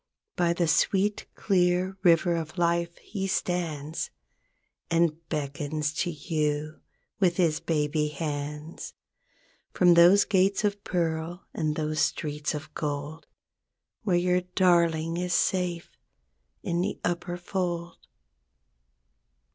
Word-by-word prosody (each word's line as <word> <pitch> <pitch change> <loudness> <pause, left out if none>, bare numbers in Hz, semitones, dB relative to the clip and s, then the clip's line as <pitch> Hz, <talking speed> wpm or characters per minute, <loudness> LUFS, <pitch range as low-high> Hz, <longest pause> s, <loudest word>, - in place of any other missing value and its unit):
By 170 -1 +2
the 170 -1 0
sweet, 195 +5 +1
clear 185 -1 +1
river 175 -1 +4
of 165 +1 -5
life 170 0 +1
he 195 -2 -4
stands, 165 -5 -2 0.8
And 165 -2 +2
beckons 150 0 -2
to 175 - 0
you 155 -1 -2 0.4
with 180 -4 +2
his 165 -4 +2
baby 150 -1 0
hands. 150 +1 -5 0.8
From 180 -1 +6
those 175 +4 +7
gates 195 0 +2
of 205 -1 -1
pearl 170 0 -2
and 155 -2 -1
those 155 -1 -2
streets 150 -1 -1
of 150 +1 -8
gold 145 +1 -4 0.7
Where 195 -6 +1
your 180 +1 +2
darling 170 -3 +2
is 180 -1 0
safe 180 -2 0 0.7
in 170 0 0
the 195 - -2
upper 175 0 -2
fold. 175 -1 -3
170 Hz, 110 wpm, -27 LUFS, 155-180 Hz, 0.8 s, those